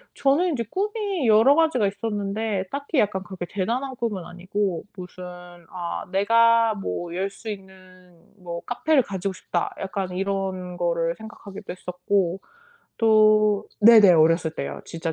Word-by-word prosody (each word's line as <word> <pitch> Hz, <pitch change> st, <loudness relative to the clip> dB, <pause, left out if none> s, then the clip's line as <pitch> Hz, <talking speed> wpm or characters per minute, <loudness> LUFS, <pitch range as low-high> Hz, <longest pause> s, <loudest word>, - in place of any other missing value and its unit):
저는 285 Hz, +7 st, +2 dB
인제 250 Hz, -8 st, -2 dB
꿈이 400 Hz, -, -2 dB
여러 225 Hz, +6 st, +6 dB
가지가 310 Hz, -10 st, +2 dB
있었는데 205 Hz, 0 st, -2 dB
딱히 280 Hz, +1 st, -1 dB
약간 190 Hz, -2 st, 0 dB
그렇게 190 Hz, -3 st, -7 dB
대단한 245 Hz, +7 st, -2 dB
꿈은 220 Hz, -7 st, -3 dB
아니고 185 Hz, +1 st, -3 dB
무슨 185 Hz, -1 st, -9 dB, 0.5 s
아 175 Hz, -2 st, -5 dB
'내가 230 Hz, +3 st, +4 dB
뭐 175 Hz, -3 st, -5 dB
열 190 Hz, +2 st, -1 dB
수 220 Hz, +3 st, -9 dB
있는 185 Hz, -3 st, -12 dB, 0.2 s
뭐 170 Hz, -2 st, -7 dB
카페를 280 Hz, +4 st, +2 dB
가지고 195 Hz, -1 st, -4 dB
싶다.' 175 Hz, -1 st, -3 dB
약간 190 Hz, -1 st, -4 dB
이런 190 Hz, -1 st, -3 dB
거를 170 Hz, -1 st, 0 dB
생각하기도 205 Hz, -2 st, -10 dB
했었고 180 Hz, +1 st, -1 dB, 0.6 s
또 215 Hz, -2 st, +4 dB
네네 215 Hz, -2 st, +8 dB
어렸을 160 Hz, 0 st, +3 dB
때요. 140 Hz, -, -5 dB
진짜 165 Hz, -1 st, -4 dB
200 Hz, 290 characters per minute, -24 LUFS, 180-225 Hz, 0.6 s, 네네